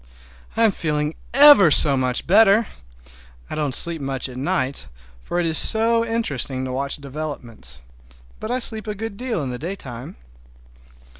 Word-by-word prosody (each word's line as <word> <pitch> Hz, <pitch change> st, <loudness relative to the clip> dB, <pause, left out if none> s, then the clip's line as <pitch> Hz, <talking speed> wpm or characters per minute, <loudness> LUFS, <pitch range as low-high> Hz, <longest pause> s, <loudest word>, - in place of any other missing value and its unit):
I'm 225 Hz, -2 st, +3 dB
feeling 150 Hz, -3 st, -3 dB, 0.2 s
ever 275 Hz, -, +7 dB
so 145 Hz, -1 st, +4 dB
much 130 Hz, -1 st, 0 dB
better! 215 Hz, +3 st, +4 dB, 0.9 s
I -, -, -4 dB
don't 145 Hz, -4 st, -1 dB
sleep 170 Hz, -2 st, +5 dB
much 135 Hz, -1 st, -3 dB
at 125 Hz, -, -11 dB
night, 130 Hz, -, -2 dB, 0.3 s
for 175 Hz, -, -4 dB
it 175 Hz, -, -1 dB
is 160 Hz, -1 st, +2 dB
so 230 Hz, +1 st, +3 dB
interesting 145 Hz, -, -2 dB
to 130 Hz, -, -5 dB
watch 140 Hz, +2 st, -1 dB
developments; 135 Hz, -, -8 dB, 0.6 s
but 215 Hz, -, -7 dB
I 250 Hz, -, -1 dB
sleep 220 Hz, -3 st, -2 dB
a 210 Hz, -, -4 dB
good 225 Hz, 0 st, -6 dB
deal 235 Hz, -, -4 dB
in 130 Hz, -, -5 dB
the 125 Hz, -, -7 dB
daytime. 140 Hz, -9 st, -8 dB
155 Hz, 155 wpm, -20 LUFS, 130-220 Hz, 0.9 s, ever